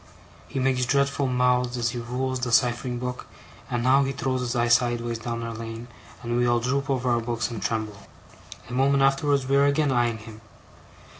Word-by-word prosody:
He - - -7
makes 130 -1 +1
dreadful 140 0 +1
mouths 125 0 +1
as 115 -2 0
he 120 - -5
rules 130 +2 -3
the 125 -1 -2
ciphering 120 0 +2
book; 125 0 -5 0.4
and 120 -1 -1
now 135 +2 +4
he 135 - -1
throws 130 -1 -2
his 125 0 -2
eye 120 0 +2
sideways 120 -1 +1
down 115 0 -4
our 115 0 -4
lane, 115 +1 -7 0.3
and 120 0 -1
we 120 0 +2
all 120 0 +3
droop 135 +4 -1
over 130 -2 0
our 120 -1 +2
books 115 -3 -2
and 110 -3 -5
tremble. 110 -2 -3 0.7
A 120 - -8
moment 135 +2 +3
afterwards 135 0 +2
we 135 +1 +1
are 140 - +5
again 140 0 +2
eyeing 120 -2 +1
him. 110 0 -12
125 Hz, 200 wpm, -25 LUFS, 120-135 Hz, 0.7 s, are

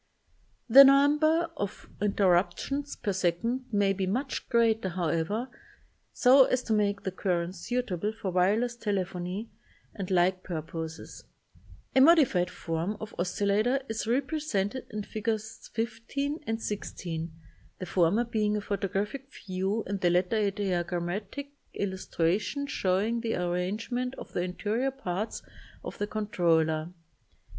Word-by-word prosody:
The 270 +4 +11
number 300 +4 +4
of 205 0 -5
interruptions 205 +8 +1
per 205 -4 -2
second 190 +8 0
may 200 -2 +3
be 190 -1 -2
much 255 +8 -2
greater, 225 -5 +3
however, 175 +6 -1 0.6
so 260 +1 +6
as 255 0 0
to 225 - -1
make 205 -1 +1
the 190 - -2
currents 180 -1 -2
suitable 215 -4 -2
for 220 -4 -4
wire 185 +4 +3
less 245 0 -2
telephony 195 -1 -3 0.4
and 195 -4 -5
like 185 0 +2
purposes. 160 -1 -6 0.7
A 265 - +7
modified 270 - +5
form 165 +5 -3
of 215 0 -7
oscillator 205 +8 +1
is 225 0 -2
repre 270 +6 0
sented 220 -3 -2
in 210 -1 -4
Figs. 220 +1 -4
15 235 +6 -2
and 225 0 -1
16, 170 -6 -4 0.5
the 185 - -5
former 180 +5 +2
being 215 -3 0
a - - -2
photographic 205 +7 -3
view 195 -1 -2
and 195 0 -3
the 175 - +4
latter 180 +5 +2
a 210 -2 +2
diagrammatic 190 +6 -3 0.2
illustration 190 - -1
showing 215 -1 0
the 225 -1 -1
ar 180 -1 -1
rangement 225 +8 -2
of - - -10
the - - 0
interior 210 +8 -1
parts 215 -6 -4 0.4
of - - -7
the 205 - -1
controller. 165 -6 +1
205 Hz, 135 wpm, -29 LUFS, 180-235 Hz, 0.7 s, The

